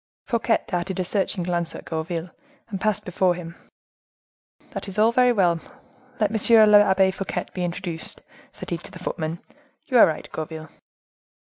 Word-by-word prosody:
Fouquet 235 -2 +1
darted 180 +1 -3
a - - +1
searching 190 0 -1
glance 175 -1 -1
at - - -9
Gourville, 165 +1 -4 0.4
and 195 -3 -5
passing 215 -2 0
before 180 0 +1
him,—"That 170 +3 -13
is 195 - -6
all 220 +2 +5
very 250 +1 +4
well; 180 -7 +2 0.6
let 210 -2 +2
M. 220 0 +6
l'Abbe 195 -2 +5
Fouquet 195 0 -4
be 180 - -3
introduced," 175 -1 -4 0.3
said - - -10
he 170 - -1
to - - -10
the 185 - -10
footman. 165 -2 -4 0.4
"You 250 - +3
are - - +9
right, 155 - -4
Gourville." 160 0 -6
185 Hz, 155 wpm, -24 LUFS, 170-210 Hz, 0.6 s, are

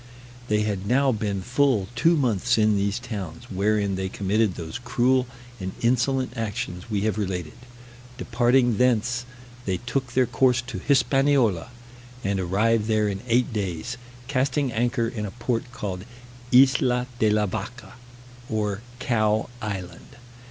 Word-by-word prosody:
They 105 -1 +2
had 100 -2 -2
now 135 +3 +3
been 105 -4 -2
full 125 -4 +2
two 165 +8 +3
months 120 -3 +1
in 110 -1 +4
these 100 +2 0
towns, 100 -9 -6
wherein 100 +1 +1
they 95 0 -2
committed 100 0 0
those 85 +5 -6
cruel 125 +1 +2 0.3
and 95 -1 -4
insolent 125 +1 +1
actions 105 -4 -4
we 105 -3 0
have 110 +1 0
related. 90 -5 -3 0.7
Departing 120 -1 +2
thence, 125 0 +1 0.4
they 95 -2 0
took 125 +3 -3
their 130 0 +4
course 125 +1 +3
to - - -6
Hispaniola, 135 - +2 0.5
and 100 0 0
arrived 105 +4 +1
there 110 -1 +2
in 100 -1 -3
eight 120 0 +2
days, 100 +3 -3 0.3
casting 135 0 0
anchor 120 +1 0
in 115 -2 -4
a 105 - -3
port 120 +1 -2
called 100 -6 -5 0.5
Isla 125 -1 +5
de 110 - +4
la 105 0 +2
Vacca, 120 +5 -6 0.6
or 105 -2 -1 0.2
Cow 110 -4 +1
Island. 95 -5 -6
115 Hz, 140 wpm, -25 LUFS, 100-125 Hz, 0.7 s, Isla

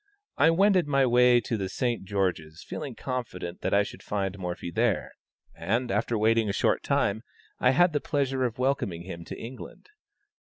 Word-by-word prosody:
I 160 - +5
wended 185 0 +3
my 140 -2 +3
way 125 0 +5
to 115 +1 -2
the 95 -2 -3
St. 120 -1 -2
George's, 90 -5 -2
feeling - - -6
confident 110 -9 -5
that - - -1
I 100 +1 +4
should - - -9
find 100 -2 -2
Morphy 90 -1 -5
there, 115 -2 0 0.4
and, 120 +4 -1
after 110 +3 0
waiting 110 0 +2
a - - -1
short - - +1
time, 105 +2 0 0.4
I 125 - +4
had 175 +6 +4
the 145 - 0
pleasure 135 -3 -1
of 120 -3 -2
welcoming 125 -10 -1
him 85 -2 -8
to - - -7
England. 125 - -10
115 Hz, 180 wpm, -27 LUFS, 95-130 Hz, 0.4 s, I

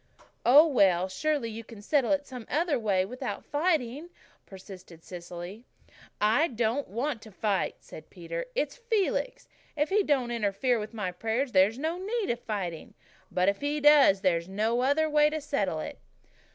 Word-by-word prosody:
"Oh, 285 +6 +8
well, 190 - +3
surely 275 +4 -1
you 225 +1 -7
can 225 -1 -12
settle 275 +1 +1
it 290 0 +1
some 250 -5 -9
way 235 - +1
without 250 +5 -6
fighting," 300 -1 -1 0.4
persisted 185 -3 -12
Cecily. 175 +4 -8 0.6
"I'm 230 +6 +2
not 235 +5 0
wanting 240 +5 -3
to 220 -1 -14
fight," 200 0 -1
said - - -12
Peter. - - -6
"It's - - -1
Felix. 465 0 -1 0.3
If 295 +1 +1
he 415 +2 +3
don't 270 -9 0
interfere 235 +2 0
with 215 +2 -7
my 195 -4 -2
prayers 225 +8 -2
there's 195 +4 +4
no 320 +5 -2
need 420 - -2
of 240 - -3
fighting. 190 -8 -5 0.3
But 180 +1 +1
if 200 0 +1
he 290 +1 -1
does 285 -10 +6
there's 170 -2 +1
no 220 +5 0
other 285 +4 +2
way 300 0 +4
to 310 +1 -3
settle 205 - -2
it." - - -7
240 Hz, 165 wpm, -28 LUFS, 200-295 Hz, 0.6 s, Oh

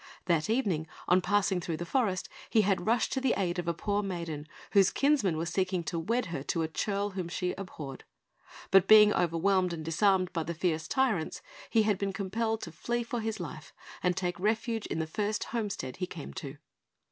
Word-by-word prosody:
That 170 0 +1
evening, 195 -10 +1 0.2
on 180 +1 +5
passing 195 -2 +1
through 170 -3 -3
the 175 - -4
forest, 190 -3 0 0.2
he 220 - +4
had 195 -2 0
rushed 230 +1 +2
to 265 - -1
the 265 - +2
aid 175 -2 0
of 175 - -4
a 170 - +2
poor 205 +4 0
maiden, 170 -6 -4 0.2
whose 195 -3 +6
kinsmen 275 - +2
were 165 - -1
seeking 185 +1 0
to 165 +1 -2
wed 230 +9 0
her 140 - -2
to 165 +3 -1
a - - 0
churl 200 +5 -1
whom 185 -3 -4
she 180 +1 -1
abhorred; 155 -8 -7 0.7
but 195 -2 +6
being 210 -1 +8
overwhelmed 180 +2 +2
and 160 -2 -6
disarmed 185 +2 +2
by 165 - 0
the 170 +1 -4
fierce 160 -1 -1
tyrants, 225 -12 0 0.3
he 225 -2 +4
had 210 -3 +1
been 195 -1 -1
compelled 220 +3 -1
to 170 - -6
flee 240 +9 -2
for 235 +1 -3
his 220 0 -3
life - - -7 0.3
and 180 0 +1
take 175 -2 -2
refuge 225 +2 0
in - - -3
the 160 - 0
first 210 +6 -1
homestead 200 - -3
he 180 - -2
came 70 - -8
to. - - -7
190 Hz, 205 wpm, -30 LUFS, 170-215 Hz, 0.7 s, being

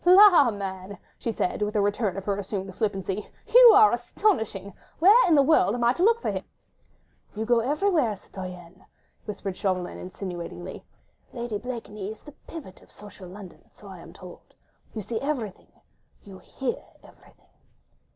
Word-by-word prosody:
"La! 360 -6 +7
man," 195 -2 -6 0.2
she 230 - -2
said 205 -2 -2
with 210 +1 -1
a - - +3
return 205 -1 0
of 195 - -6
her 200 - 0
assumed 195 -1 -5
flippancy, 195 -1 -3 0.2
"you - - +8
are 425 +1 +7
astonishing. 215 - -1 0.2
Where 405 +8 +6
in 335 - +5
the 280 - +6
world 275 -7 +3
am 240 - -2
I 235 +1 +4
to 345 - -5
look 455 +4 +4
for - - 0
him?" - - -4 0.9
"You 220 +1 -3
go 240 0 +3
everywhere, 295 - +1
citoyenne," 185 -2 -10 0.4
whispered 200 -3 -5
Chauvelin, 185 -3 -2
insinuatingly, 175 -2 -7 0.5
"Lady 235 -4 -4
Blakeney 215 -4 -6
is 220 - -12
the 295 - -13 0.2
pivot 290 - -10
of - - -21
social 205 -3 -13
London, 190 0 -13
so - - -17
I - - -10
am - - -12
told... - - -14 0.4
you 215 - -4
see 225 +3 -4
everything, 255 -9 -4 0.5
you 195 -2 -12
hear 265 -2 -5 0.2
everything." - - -21
210 Hz, 160 wpm, -26 LUFS, 190-275 Hz, 0.9 s, you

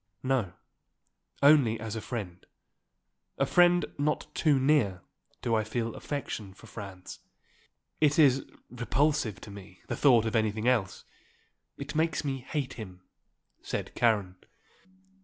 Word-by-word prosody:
"No. 130 -9 0 0.9
Only 140 -6 +5
as 110 -1 -5
a 110 - -4
friend, 95 -8 -6 0.9
a - - +2
friend 175 0 +4
not 150 +1 -1
too 150 -4 +3
near, 130 - +2 0.4
do 115 - 0
I 110 -1 +2
feel 115 +1 -3
affection 110 -9 -5
for - - -15
Franz. 95 -4 -9 0.8
It 150 -1 +3
is 135 -4 +5 0.3
repulsive 125 -2 0
to 105 - -10
me 95 -2 -12
the - - -1
thought 120 -6 +5
of 110 - -2
anything 110 +1 0
else. 115 -7 +1 0.7
It 140 0 -6
makes 160 0 0
me 135 -1 -2
hate 135 +1 -4
him," 95 -5 -9 0.6
said - - -4
Karen. 105 -6 +1
120 Hz, 130 wpm, -29 LUFS, 105-140 Hz, 0.9 s, Only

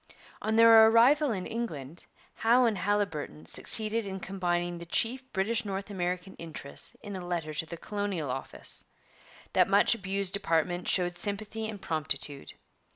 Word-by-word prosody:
On 220 0 0
their 225 -1 +8
arrival 255 +6 +5
in 190 -4 -3
England, 165 - -5 0.3
Howe 240 +3 +4
and 225 -2 +2
Haliburton 175 - -2
succeeded 215 - +2
in 190 0 -5
combining 175 -2 -2
the 170 - -8
chief 235 +9 0
British 215 +5 0
North 200 0 -5
American 180 0 -3
interests 160 -4 -8
in 205 -2 -6
a 185 - -6
letter 170 -3 -3
to 160 +2 -3
the 170 - -7
Colonial 195 -7 -3
Office. 135 +1 -5 0.7
That - - +4
much 200 +3 +5
abused 195 -3 -2
department 175 -1 0
showed 175 -1 +1
sympathy 215 +4 -2
and 210 -2 -7
promptitude. 145 -4 -3
195 Hz, 150 wpm, -29 LUFS, 170-220 Hz, 0.7 s, their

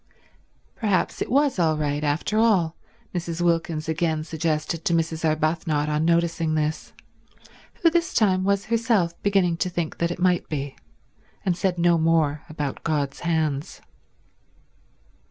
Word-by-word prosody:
Perhaps 205 -4 0
it - - -2
was 275 -3 +2
all 160 -2 +2
right 145 0 -1
after 150 +9 0
all, 190 -8 +3 0.4
Mrs. 170 -2 -3
Wilkins 165 -2 0
again 160 -1 0
suggested 160 0 -2
to 170 - +2
Mrs. 165 0 -1
Arbuthnot 155 -1 0
on 150 +1 0
noticing 170 -1 +1
this, 155 +1 -2 0.9
who 335 - +7
this 340 0 +1
time 190 -4 +2
was 200 0 +1
herself 225 -6 +1
beginning 190 -4 +2
to 180 - -1
think 170 -2 -4
that 170 - +1
it 175 - -4
might 180 -1 +1
be, 140 -2 -4 0.7
and 180 -2 +2
said 180 0 -1
no 170 -1 +3
more 160 -3 +2
about 150 -3 -4
God's 145 -4 -1
hands. 155 -4 -1
165 Hz, 140 wpm, -24 LUFS, 155-180 Hz, 0.9 s, who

